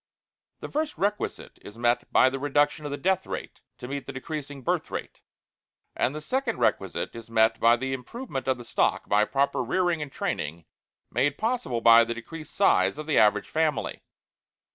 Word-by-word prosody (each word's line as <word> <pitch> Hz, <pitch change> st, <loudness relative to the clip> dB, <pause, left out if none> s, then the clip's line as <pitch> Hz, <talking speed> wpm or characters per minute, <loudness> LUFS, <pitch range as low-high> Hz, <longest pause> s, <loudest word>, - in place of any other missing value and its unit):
The -, -, -5 dB
first 305 Hz, +1 st, -2 dB
requisite 205 Hz, +2 st, -2 dB
is 105 Hz, -, -12 dB
met 120 Hz, +1 st, +1 dB
by 130 Hz, -, +5 dB
THE 135 Hz, -, -4 dB
REDUCTION 145 Hz, +2 st, +1 dB
OF -, -, -3 dB
THE 145 Hz, -, -3 dB
DEATH 190 Hz, +2 st, 0 dB
RATE -, -, -6 dB, 0.2 s
to 125 Hz, -, -8 dB
meet 140 Hz, +1 st, -5 dB
the -, -, -4 dB
decreasing 145 Hz, 0 st, -6 dB
birth -, -, -1 dB
rate; -, -, -6 dB, 0.7 s
and 130 Hz, -, 0 dB
the 155 Hz, -, -5 dB
second 265 Hz, -, -1 dB
requisite 95 Hz, -7 st, 0 dB
is 115 Hz, -1 st, -9 dB
met 115 Hz, 0 st, +3 dB
by 115 Hz, +1 st, +6 dB
the 130 Hz, +2 st, -3 dB
improvement 135 Hz, -, -6 dB
of 130 Hz, -1 st, +2 dB
the 120 Hz, -, -10 dB
stock -, -, 0 dB
by 105 Hz, +1 st, +3 dB
proper 140 Hz, +1 st, 0 dB
rearing 170 Hz, +6 st, 0 dB
and 145 Hz, -2 st, -5 dB
training 80 Hz, -, -3 dB, 0.5 s
made 145 Hz, +1 st, +1 dB
possible 220 Hz, -, -1 dB
by 115 Hz, 0 st, +8 dB
the 115 Hz, 0 st, -3 dB
decreased 155 Hz, +7 st, -9 dB
size 195 Hz, -6 st, +3 dB
of 155 Hz, -, -6 dB
the 155 Hz, -, +3 dB
average 105 Hz, -1 st, +3 dB
family. 155 Hz, -2 st, -1 dB
135 Hz, 185 wpm, -26 LUFS, 120-155 Hz, 0.7 s, by